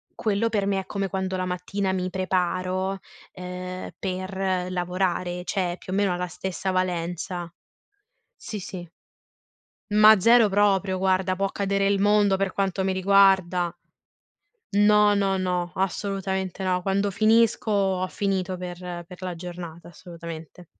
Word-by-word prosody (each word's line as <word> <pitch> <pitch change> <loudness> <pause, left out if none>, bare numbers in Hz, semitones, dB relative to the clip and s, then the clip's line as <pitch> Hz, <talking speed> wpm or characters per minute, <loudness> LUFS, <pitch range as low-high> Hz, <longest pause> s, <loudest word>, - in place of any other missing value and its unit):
quello 220 +1 0
per 205 -3 0
me 195 -1 +1
è - - -13
come 195 0 -2
quando 190 0 -2
la 185 - -1
mattina 190 +2 -2
mi 185 0 -1
preparo, 185 +1 -1 0.3
ehm, 180 0 -6
per 185 -1 -2
lavorare, 180 0 -1
cioè 180 -2 -1
più 185 - -9
o - - 0
meno 200 -3 +2
ha - - -3
la 180 0 -2
stessa 190 +2 -4
valenza. 175 -1 -2 0.9
Sì, 210 - -6
sì. 180 -2 -7 1.0
Ma 215 0 +7
zero 230 +1 +6
proprio, 195 -1 +2
guarda 185 0 +1
può 195 0 0
cadere 200 0 0
il 200 -1 +2
mondo 205 -1 +4
per 195 -1 -1
quanto 195 -1 -1
mi 190 - +1
riguarda. 190 -2 +3 1.0
No, 210 0 +5
no, 195 -1 +1
no, 180 -2 -1
assolutamente 190 0 -2
no. 180 -1 +1
Quando 200 +2 0
finisco, 220 +2 +3
ho 190 -2 +1
finito 190 -2 -1
per 175 -1 -6
per 180 0 -12
la 180 -1 -3
giornata, 170 -1 -8
assolutamente. 170 -1 -10
190 Hz, 140 wpm, -25 LUFS, 180-195 Hz, 1.0 s, Ma